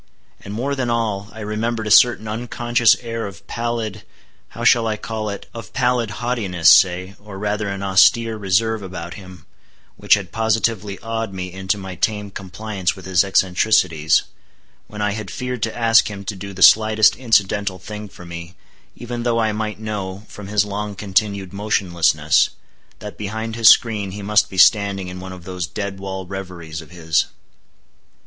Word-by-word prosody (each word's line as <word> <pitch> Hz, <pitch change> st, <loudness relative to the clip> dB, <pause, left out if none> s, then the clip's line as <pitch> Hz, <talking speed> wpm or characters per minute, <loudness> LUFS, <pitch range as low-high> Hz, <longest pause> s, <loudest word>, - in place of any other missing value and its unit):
And 100 Hz, -, -8 dB
more 125 Hz, +7 st, -2 dB
than 130 Hz, -3 st, -2 dB
all, 105 Hz, -4 st, -1 dB
I 110 Hz, -, -10 dB
remembered 110 Hz, +2 st, -2 dB
a 105 Hz, -, -2 dB
certain 115 Hz, 0 st, +5 dB
unconscious 120 Hz, +1 st, +2 dB
air 115 Hz, -2 st, -4 dB
of 95 Hz, -4 st, -12 dB
pallid—how 115 Hz, 0 st, -6 dB
shall 120 Hz, -1 st, +4 dB
I 110 Hz, -1 st, -1 dB
call 110 Hz, 0 st, -4 dB
it?—of 105 Hz, +3 st, -9 dB
pallid 125 Hz, -3 st, +1 dB
haughtiness, 105 Hz, -7 st, +2 dB
say, 95 Hz, +1 st, +4 dB
or 105 Hz, -2 st, -10 dB
rather 105 Hz, +1 st, -2 dB
an 100 Hz, 0 st, -4 dB
austere 100 Hz, +4 st, +4 dB
reserve 110 Hz, +2 st, 0 dB
about 90 Hz, -3 st, -7 dB
him, 95 Hz, -5 st, -12 dB, 0.5 s
which -, -, +4 dB
had 95 Hz, -4 st, -6 dB
positively 110 Hz, -3 st, 0 dB
awed 115 Hz, -2 st, -3 dB
me 90 Hz, -1 st, -5 dB
into 95 Hz, +2 st, -1 dB
my 95 Hz, -2 st, -7 dB
tame 105 Hz, +2 st, -2 dB
compliance 95 Hz, 0 st, -3 dB
with 95 Hz, -, -12 dB
his 95 Hz, -1 st, +3 dB
eccentricities, 90 Hz, -4 st, +2 dB, 0.6 s
when 105 Hz, 0 st, -5 dB
I 105 Hz, -, +1 dB
had 105 Hz, -2 st, -5 dB
feared 125 Hz, +1 st, -5 dB
to 110 Hz, +1 st, -2 dB
ask 115 Hz, -2 st, +4 dB
him 100 Hz, -1 st, -8 dB
to 105 Hz, -, -4 dB
do 100 Hz, +1 st, -8 dB
the 95 Hz, -1 st, 0 dB
slightest 110 Hz, +4 st, +6 dB
incidental 105 Hz, -5 st, +1 dB
thing 105 Hz, +3 st, -8 dB
for 90 Hz, -, -13 dB
me, 85 Hz, +1 st, -9 dB, 0.4 s
even 120 Hz, 0 st, -6 dB
though 120 Hz, -1 st, 0 dB
I 110 Hz, -1 st, +1 dB
might 105 Hz, 0 st, -4 dB
know, 100 Hz, -2 st, -5 dB
from 105 Hz, -2 st, -10 dB
his 105 Hz, 0 st, +2 dB
long 105 Hz, 0 st, -4 dB
continued 100 Hz, -1 st, -1 dB
motionlessness, 85 Hz, -7 st, +2 dB, 0.5 s
that 105 Hz, -1 st, -9 dB
behind 110 Hz, +2 st, -4 dB
his 115 Hz, -1 st, +7 dB
screen 105 Hz, -4 st, +3 dB
he 100 Hz, 0 st, -7 dB
must 105 Hz, +1 st, +3 dB
be 95 Hz, -, -9 dB
standing 100 Hz, -1 st, +4 dB
in 90 Hz, 0 st, -8 dB
one 95 Hz, 0 st, -8 dB
of 90 Hz, -2 st, -10 dB
those 90 Hz, -1 st, -4 dB
dead 100 Hz, 0 st, -5 dB
wall 95 Hz, -1 st, -5 dB
reveries 90 Hz, -4 st, -7 dB
of 80 Hz, -, -15 dB
his. 80 Hz, -2 st, 0 dB
105 Hz, 170 wpm, -20 LUFS, 95-110 Hz, 0.6 s, his